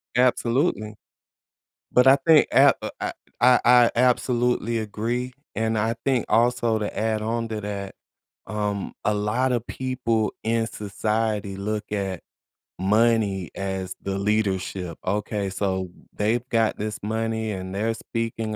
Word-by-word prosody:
Absolutely. 125 Hz, -, +1 dB, 1.0 s
But 125 Hz, +1 st, +5 dB
I 135 Hz, -, +9 dB
think 160 Hz, -2 st, +6 dB
ap -, -, +6 dB
uh, -, -, -3 dB
I -, -, -3 dB, 0.3 s
I 125 Hz, 0 st, +6 dB
I 120 Hz, -1 st, +6 dB
absolutely 120 Hz, -2 st, +2 dB
agree, 120 Hz, +4 st, -3 dB, 0.2 s
and 110 Hz, +1 st, 0 dB
I 110 Hz, +2 st, 0 dB
think 130 Hz, -5 st, +2 dB
also 120 Hz, -1 st, +2 dB
to 105 Hz, -, -4 dB
add 110 Hz, -1 st, 0 dB
on 115 Hz, +1 st, -1 dB
to 110 Hz, -1 st, -4 dB
that, 100 Hz, -1 st, -5 dB, 0.5 s
um, 105 Hz, -1 st, -2 dB
a 105 Hz, -, +2 dB
lotta 120 Hz, +4 st, +1 dB
people 120 Hz, -3 st, -1 dB
in 115 Hz, 0 st, +1 dB
society 105 Hz, -1 st, -2 dB
look 105 Hz, +2 st, -3 dB
at 95 Hz, -4 st, -2 dB, 0.6 s
money 105 Hz, -2 st, +2 dB
as 95 Hz, -1 st, -3 dB
the 95 Hz, 0 st, -3 dB
leadership. 95 Hz, -4 st, -1 dB
Okay, 100 Hz, 0 st, -1 dB
so 95 Hz, -1 st, -2 dB, 0.2 s
they've 115 Hz, +4 st, 0 dB
got 115 Hz, -1 st, +1 dB
this 105 Hz, 0 st, -3 dB
money 110 Hz, 0 st, -1 dB
and 95 Hz, -1 st, -5 dB
they're 110 Hz, +3 st, 0 dB
speaking 115 Hz, -1 st, -3 dB
110 Hz, 135 wpm, -24 LUFS, 100-115 Hz, 1.0 s, I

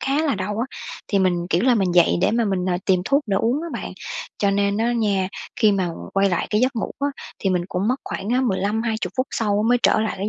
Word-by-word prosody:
khá 275 Hz, +3 st, +1 dB
là 300 Hz, -4 st, +1 dB
đau 210 Hz, +2 st, -3 dB
á, 240 Hz, -, 0 dB, 0.4 s
thì 200 Hz, -, +2 dB
mình, 175 Hz, -2 st, +1 dB
kiểu 175 Hz, +5 st, +2 dB
là, 255 Hz, -1 st, +4 dB
mình 190 Hz, -5 st, +1 dB
dậy 175 Hz, -1 st, +5 dB
để -, -, +3 dB
mà 235 Hz, +1 st, +1 dB
mình, 190 Hz, -3 st, -1 dB
à, 180 Hz, -, +1 dB
tìm 185 Hz, -2 st, +3 dB
thuốc 280 Hz, +8 st, +2 dB
để 195 Hz, -2 st, +1 dB
uống 245 Hz, +9 st, +1 dB
á 340 Hz, -, -4 dB
bạn. -, -, -5 dB, 0.5 s
Cho 200 Hz, -, +2 dB
nên 200 Hz, 0 st, +1 dB
á 230 Hz, +2 st, +1 dB
nha, 200 Hz, -5 st, +1 dB, 0.3 s
khi 215 Hz, -1 st, +4 dB
mà 190 Hz, -3 st, 0 dB, 0.3 s
quay 195 Hz, 0 st, +3 dB
lại 175 Hz, -, 0 dB
cái 210 Hz, -, +2 dB
giấc 255 Hz, 0 st, +1 dB
ngủ 220 Hz, -, -2 dB
á, 285 Hz, -, +1 dB, 0.3 s
thì 195 Hz, -, 0 dB
mình 180 Hz, -1 st, +1 dB
cũng 190 Hz, +4 st, -1 dB
mất 255 Hz, -, +2 dB
khoảng 200 Hz, -, -5 dB
á 250 Hz, +2 st, +2 dB
15-20 220 Hz, 0 st, -1 dB
phút 255 Hz, +1 st, +1 dB
sau 210 Hz, -2 st, 0 dB
mới 245 Hz, 0 st, +4 dB
trở -, -, +4 dB
lại 220 Hz, -1 st, -1 dB
cái 200 Hz, +2 st, -1 dB
210 Hz, 265 wpm, -22 LUFS, 190-240 Hz, 0.5 s, dậy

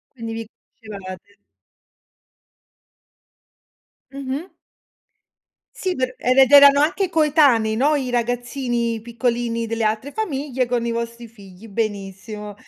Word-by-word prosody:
quindi 230 Hz, -2 st, -6 dB
vi 225 Hz, -1 st, -6 dB, 0.3 s
conoscevate. 200 Hz, -2 st, -10 dB, 2.8 s
Mh-mh. 275 Hz, +5 st, -6 dB, 1.2 s
Sì 370 Hz, -1 st, -2 dB
per 255 Hz, 0 st, -2 dB
era 255 Hz, +2 st, +4 dB
ed 265 Hz, +1 st, +2 dB
erano 280 Hz, 0 st, +8 dB
anche 360 Hz, +6 st, +1 dB
coetanei, 290 Hz, -9 st, +3 dB
no, 285 Hz, +6 st, +3 dB
i 265 Hz, -4 st, -2 dB
ragazzini 240 Hz, -1 st, -1 dB
piccolini 235 Hz, 0 st, -2 dB
delle 225 Hz, 0 st, -2 dB
altre 220 Hz, +7 st, -2 dB
famiglie 275 Hz, -, -2 dB
con 240 Hz, -1 st, -1 dB
i 235 Hz, -, -1 dB
vostri 235 Hz, 0 st, -5 dB
figli, 200 Hz, -2 st, -15 dB
benissimo. 210 Hz, 0 st, -5 dB
235 Hz, 110 wpm, -21 LUFS, 225-275 Hz, 2.8 s, erano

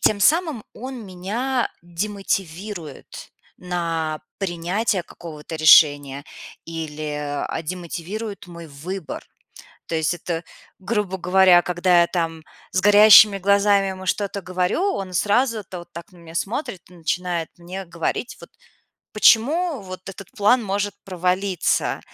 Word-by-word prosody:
тем 210 Hz, -, +3 dB
самым 310 Hz, -, +2 dB
он 255 Hz, -1 st, -7 dB
меня 230 Hz, +8 st, -2 dB
демотивирует 180 Hz, -2 st, -5 dB, 0.3 s
на 165 Hz, -3 st, -3 dB, 0.2 s
принятия 185 Hz, +2 st, -1 dB
какого-то 160 Hz, -2 st, -10 dB
решения 145 Hz, -3 st, +5 dB, 0.4 s
или, 155 Hz, -2 st, -5 dB, 0.3 s
а, 165 Hz, -, -3 dB
демотивирует 185 Hz, +5 st, -6 dB
мой 170 Hz, -1 st, -10 dB
выбор. 160 Hz, +5 st, -7 dB, 0.6 s
То 165 Hz, -, -3 dB
есть 160 Hz, +1 st, +1 dB
это, 170 Hz, -1 st, -4 dB, 0.4 s
грубо 195 Hz, -1 st, -2 dB
говоря, 180 Hz, 0 st, +5 dB
когда 175 Hz, 0 st, +3 dB
я 170 Hz, -, +3 dB
там 165 Hz, -3 st, -3 dB, 0.3 s
с 185 Hz, -, +1 dB
горящими 205 Hz, 0 st, +8 dB
глазами 200 Hz, 0 st, +3 dB
ему 190 Hz, 0 st, -6 dB
что-то 200 Hz, +1 st, -2 dB
говорю, 185 Hz, -, -1 dB
он 190 Hz, -2 st, -5 dB
сразу-то 210 Hz, -1 st, 0 dB
вот 175 Hz, 0 st, -14 dB
так 170 Hz, +4 st, -10 dB
на 180 Hz, -, -18 dB
меня 165 Hz, -1 st, -13 dB
смотрит 200 Hz, -, -3 dB
и -, -, -17 dB
начинает 175 Hz, 0 st, -2 dB
мне 180 Hz, +3 st, -7 dB
говорить, 170 Hz, +8 st, -3 dB
вот, -, -, -12 dB, 0.6 s
почему 275 Hz, -, +3 dB
вот 185 Hz, -1 st, -8 dB
этот 195 Hz, -1 st, -11 dB
план 240 Hz, +1 st, +3 dB
может 205 Hz, 0 st, -2 dB
провалиться. 185 Hz, 0 st, 0 dB
185 Hz, 125 wpm, -22 LUFS, 170-205 Hz, 0.6 s, горящими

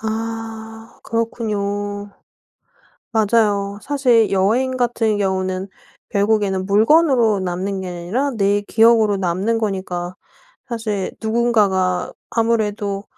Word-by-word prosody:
아 225 Hz, 0 st, -6 dB
그렇군요. 205 Hz, -3 st, -3 dB, 1.0 s
맞아요. 205 Hz, -2 st, +1 dB
사실 250 Hz, -6 st, +2 dB
여행 230 Hz, +7 st, +1 dB
같은 230 Hz, -4 st, 0 dB
경우는 190 Hz, -1 st, -1 dB, 0.4 s
결국에는 200 Hz, -2 st, +1 dB
물건으로 225 Hz, 0 st, +4 dB
남는 185 Hz, +2 st, -3 dB
게 185 Hz, -, -5 dB
아니라 180 Hz, +11 st, -2 dB
내 200 Hz, 0 st, +2 dB
기억으로 220 Hz, -1 st, +4 dB
남는 195 Hz, +5 st, 0 dB
거니까 185 Hz, -4 st, -3 dB, 0.5 s
사실 215 Hz, -5 st, -3 dB
누군가가 210 Hz, -5 st, +1 dB, 0.2 s
아무래도 210 Hz, -3 st, 0 dB
210 Hz, 230 characters per minute, -20 LUFS, 195-225 Hz, 1.0 s, 물건으로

